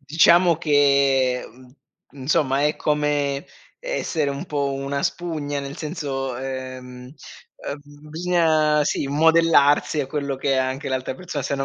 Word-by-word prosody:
Diciamo 170 +4 +4
che, 140 -4 +2
mhmm, 125 +1 -18 0.4
insomma 140 0 0
è 150 - -1
come 145 -2 -1 0.3
essere 170 - -2
un 140 0 -5
po' 140 -2 -1
una 140 +1 -3
spugna, 155 -5 -3
nel 140 +1 -7
senso 140 -5 -4
uhm, 130 -1 -7 0.5
uhm, 145 +1 -10
bisogna, 155 -3 +2
sì, 145 - -1
modellarsi 155 0 +3
a 135 - -3
quello 140 -1 -3
che 135 +1 -1
è - - +1
anche 130 +2 -2
l'altra 130 0 -3
perso 165 -1 -5
Se 140 - -3
una 135 - -2
145 Hz, 140 wpm, -22 LUFS, 135-155 Hz, 0.5 s, Diciamo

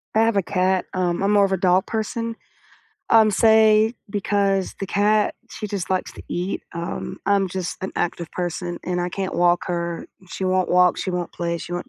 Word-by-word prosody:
I - - +4
have 225 -2 +2
a 195 - +2
cat, 185 0 +2
um, 175 -2 +1
I’m 200 - +2
more 200 -1 +6
of - - -8
a 190 - +2
dog 185 +1 +4
person, 220 +1 -2 0.9
um, 220 -1 +6 0.2
say, 220 0 +5 0.2
because 195 -1 +1 0.2
the - - -1
cat, 210 +1 +3 0.2
she 215 - -5
just 200 -3 -4
likes 185 - -3
to - - -11
eat, 180 +3 -2 0.2
um, 170 - -4 0.3
I’m 200 -1 +3
just 185 -2 -2
an 190 - -4
active 170 -1 -2
person, 175 0 -3 0.2
and 180 0 0
I 175 - -1
can’t 190 -1 -2
walk 175 0 +4
her, 170 -1 -1 0.5
she 190 - -3
won’t 185 -1 +1
walk, 180 -1 +6
she 185 - -3
won’t 175 -1 -4
play, 170 0 -1
she 175 - -8
won’t 175 - -5
190 Hz, 200 wpm, -22 LUFS, 175-205 Hz, 0.9 s, more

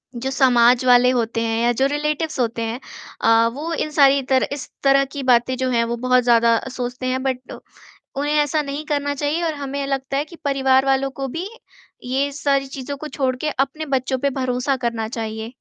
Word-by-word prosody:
जो 260 +3 -3
समाज 245 -2 +4
वाले 250 0 +6
होते 230 0 -1
हैं 225 0 -1
या 240 - +3
जो - - +5
रिलेटिव्स 300 0 -2
होते 230 -1 -1
हैं 230 +2 -3 0.4
अ, 230 0 +4
वो 320 +4 -4
इन 305 - -2
सारी 280 -2 +5
तरह 260 - +3
इस 285 - -7
तरह 275 0 +4
की 275 - -4
बातें 250 0 +3
जो 260 0 -1
हैं 235 -1 +2
वो 235 +1 -2
बहुत 250 -1 +4
ज़्यादा 230 -1 +4 0.2
सोचते 250 +1 -4
हैं, 260 +1 -1
बट 255 -1 -4 0.6
उन्हें 290 +2 -1
ऐसा 300 +1 +2
नहीं 285 +1 -5
करना 285 -1 -1
चाहिए 295 +4 -1
और 320 -2 0
हमें 280 0 -4
लगता 275 0 -2
है 290 - -1
कि 340 - -13
परिवार 265 -1 +3
वालों 270 0 +1
को 270 - -1
भी 330 +8 -5 0.6
ये 270 +3 0
सारी 275 -1 0
चीज़ों 275 +1 -6
को 305 - -7
छोड़ 265 -4 -1
के 310 - 0
अपने 285 +3 -2
बच्चों 260 +1 -2
पे - - +4
भरोसा 255 +1 0
करना 230 -2 -1
चाहिए। 220 +1 -5
265 Hz, 205 wpm, -21 LUFS, 245-285 Hz, 0.6 s, वाले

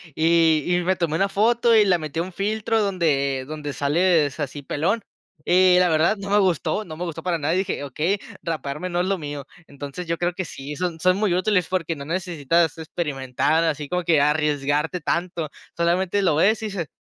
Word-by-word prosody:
Y 160 -1 +3
y 180 0 +1
me 185 +2 +1
tomé 170 -3 -1
una 195 +2 +1
foto 230 +3 +3
y 215 -1 +6
la 180 -3 +3
metí 155 +1 -5
a - - +1
un 185 0 -9
filtro 215 +3 0
donde 140 -9 0
donde 150 -1 -5
sales 155 0 +1
así 145 0 -4
pelón. 190 +11 -1 0.4
Y 180 0 +5
la 180 0 +4
verdad, 160 +6 +2
no 200 0 -6
me 205 - +5
gustó, 185 +1 +1
no 155 -4 -9
me 175 - -4
gustó 165 -2 -5
para 175 -1 -1
nada 155 +2 -1
y 185 - +2
dije: 190 -6 -2
"Okey, 155 +8 -1 0.2
raparme 155 +2 -4
no 175 0 -1
es 180 - +1
lo 195 -1 -1
mío". 145 -2 -6 0.2
Entonces 145 +5 -8
yo 170 0 -1
creo 175 +1 -1
que 185 -1 -4
sí, 140 +1 -7
son 175 -3 -3
son 185 +2 +3
muy 200 -3 +1
útiles, 185 -1 +1
porque 170 -3 -2
no 140 - -8
necesitas 170 -1 0
experimentar, 145 -1 -1
así 150 -2 -2
como 180 +4 -1
que 160 -3 +3
arriesgarte 150 +2 +1
tanto, 170 0 -2 0.3
solamente 180 +3 +1
lo 170 - +3
ves 215 +7 +3
y 220 - -3
dices: 195 -6 -4
170 Hz, 210 wpm, -23 LUFS, 150-185 Hz, 0.4 s, y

